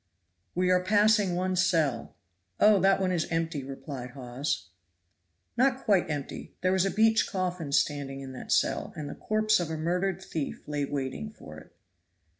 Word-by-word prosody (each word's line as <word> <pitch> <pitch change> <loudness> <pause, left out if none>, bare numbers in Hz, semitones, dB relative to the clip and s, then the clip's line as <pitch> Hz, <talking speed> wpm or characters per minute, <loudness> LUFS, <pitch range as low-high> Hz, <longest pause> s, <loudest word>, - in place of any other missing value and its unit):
"We 180 +1 +2
are 180 0 +3
passing 205 -1 +3
one 185 +1 0
cell." 165 -10 +1 0.4
"Oh! 210 -1 +6
that 195 +1 +4
one 185 -1 +1
is 170 -3 0
empty," 165 -3 -1
replied 135 -1 -7
Hawes. 125 - -3 0.9
Not 260 +2 +2
quite 195 -6 +3
empty; 145 -2 -5
there 185 - +2
was 190 0 +2
a - - +1
beech 220 +2 +3
coffin 180 -6 -3
standing 140 -1 0
in 135 -1 -7
that 130 - -8
cell, - - +1
and 150 -2 -5
the - - -5
corpse 215 -1 +1
of 175 -3 -2
a 160 - -3
murdered 180 +4 0
thief 160 -6 -5
lay 145 -1 -1
waiting 130 - -4
for - - -12
it. - - -19
175 Hz, 170 wpm, -28 LUFS, 140-190 Hz, 0.9 s, Oh